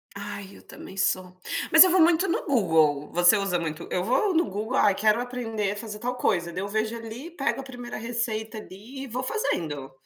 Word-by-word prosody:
Ai 200 -1 -7
eu - - -16
também 195 - -12
sou. 185 -1 0 0.3
Mas 320 +2 +11
eu 370 - +3
vou 370 - +4
muito 340 +3 +4
no 340 - -1
Google, 160 - +2
você 175 +4 +5
usa 195 -3 0
muito 165 0 -5
eu 180 - 0
vou 355 - +1
no 330 +1 +3
Google, 215 +6 -3
aí 200 -2 +4
quero 215 +3 +2
aprender 225 -5 -3
a - - -4
fazer 210 -1 -7
tal 250 +2 -3
coisa, 170 -7 0
daí 185 - -4
eu 200 - -3
vejo 220 +2 -1
ali 230 +5 -8
e 345 - -12
pego 275 -5 -2
a - - -10
primeira 245 -2 -8
receita 230 -1 -3
ali 215 +7 -9
e - - -7
vou 250 +1 -4
fazendo. 160 - -2
220 Hz, 220 wpm, -26 LUFS, 190-250 Hz, 0.3 s, Mas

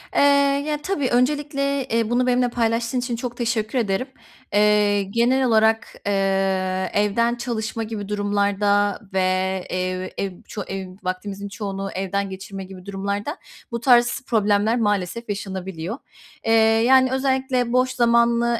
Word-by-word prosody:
Eee, - - +4 0.5
ya 300 - 0
tabii, 295 -7 -1
öncelikle, 280 +1 0
eee, 230 -2 0
bunu 250 +1 +1
benimle 250 0 +2
paylaştığın 230 +1 0
için 245 -1 -2
çok 240 0 -5
teşekkür 230 0 -1
ederim. 210 +3 -1 0.5
Eee, 205 -1 +3
genel 240 +6 +2
olarak, 220 -1 +3 0.2
eee, 195 -1 0
evden 220 +4 +2
çalışma 230 -2 -3
gibi 215 -2 -6
durumlarda 205 0 +1
ve 190 - +1 0.5
ev 185 0 -2
ev 195 -1 -2 0.2
ço 210 - -5
ev 190 -1 -5
vaktinizin 195 +2 -4
çoğunu 195 0 -4
evde 195 +1 -1
geçirme 195 0 -7
gibi 185 -1 -11
durumlarda 200 - -3 0.3
bu 235 - -2
tarz 240 0 +4
problemler 215 0 +2
maalesef 205 +1 -1
yaşanabiliyor. 190 -1 -4 0.5
Eee, 225 - +1 0.3
yani, 260 0 +5
özellikle 260 -2 0
boş 255 +1 +3
zamanı 235 -1 +2
220 Hz, 130 wpm, -22 LUFS, 195-245 Hz, 0.5 s, yani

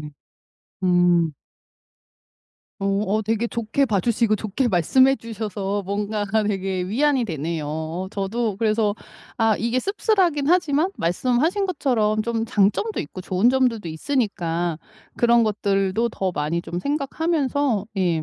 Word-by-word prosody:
네. 150 0 -8 0.7
음. 175 -3 +3 1.5
어. 195 - -1
어 200 +2 0
되게 225 +2 0
좋게 235 +4 0
봐주시고 220 +1 +1
좋게 220 +5 -1
말씀해 260 +9 +4
주셔서 205 -3 -4
뭔가가 205 +2 -1
되게 195 -2 -1
위안이 260 +6 +1
되네요. 160 -3 -3
어 160 +4 -4
저도 210 +1 -2
그래서 215 -1 +1 0.4
아 225 -3 +3
이게 235 +2 0
씁쓸하긴 375 - +1
하지만 330 -1 +2
말씀하신 255 - +1
것처럼 230 - +1
좀 225 0 -1
장점도 215 - +1
있고 155 +5 -7
좋은 190 +5 +2
점들도 245 -8 +1
있으니까 175 - -1 0.4
그런 235 0 +4
것들도 205 0 0
더 190 -3 -2
많이 160 +2 -2
좀 175 - -5
생각하면서 285 - 0
예. 175 -4 +1
215 Hz, 275 characters per minute, -23 LUFS, 185-250 Hz, 1.5 s, 말씀해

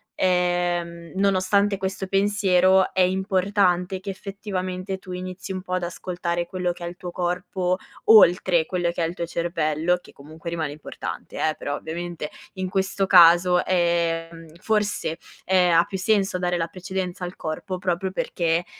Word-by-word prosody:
ehm, 175 -2 0
nonostante 200 +1 +2
questo 190 0 -3
pensiero 190 -1 +3
è 185 - +1
importante 190 -1 +1
che 190 - -7
effettivamente 190 -1 -4
tu 185 -1 -11
inizi 185 +1 -6
un 185 -1 -4
po' 185 0 -6
ad 185 -1 0
ascoltare 175 0 -3
quello 180 0 -2
che 175 0 -7
è - - -3
il 175 - -7
tuo 180 - -7
corpo, 180 +1 -1 0.3
oltre 180 -5 +6
quello 175 0 -1
che 170 - -2
è - - +1
il 165 - -5
tuo 170 -1 -4
cervello, 170 0 0
che - - -16
comunque 160 +4 -9
rimane 160 -3 -2
importante, 150 +1 -7
eh, 155 -1 0
però 145 - -4
ovviamente, 165 0 -5 0.2
in 185 -1 -3
questo 190 +1 0
caso, 180 -1 +6
ehm, 165 -2 -1
forse, 210 -6 -1 0.3
ehm, 180 -2 +4
ha 170 - +6
più 190 - -5
senso 195 -1 +1
dare 180 0 0
la 165 -1 -1
precedenza 185 0 -4
al 180 - -7
corpo 170 +4 -4
proprio 180 +1 -1
perché, 175 -6 -1
180 Hz, 160 wpm, -24 LUFS, 170-190 Hz, 0.3 s, oltre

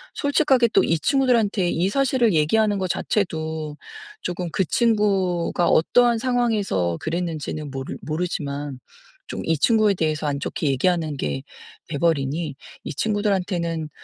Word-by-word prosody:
솔직하게 280 -4 +3
또 - - +5
이 165 - +2
친구들한테 225 - +2
이 175 +3 +1
사실을 250 -3 +2
얘기하는 205 +7 +2
거 185 - -1
자체도 160 -6 -2 0.4
조금 175 -1 -3
그 190 +3 +1
친구가 195 -6 +1
어떠한 240 +8 +4
상황에서 220 - 0
그랬는지는 160 -3 -3
모르 135 -1 -5
모르지만 145 -4 -3 0.5
좀 - - -5
이 165 -1 +1
친구에 215 - +3
대해서 155 -4 -1
안 140 -1 -1
좋게 150 - -3
얘기하는 155 +3 +1
게 70 - -3 0.4
돼 145 - -4
버리니 155 -1 0 0.3
이 - - -5
친구들한테는 180 -5 -1
175 Hz, 315 characters per minute, -23 LUFS, 155-215 Hz, 0.5 s, 또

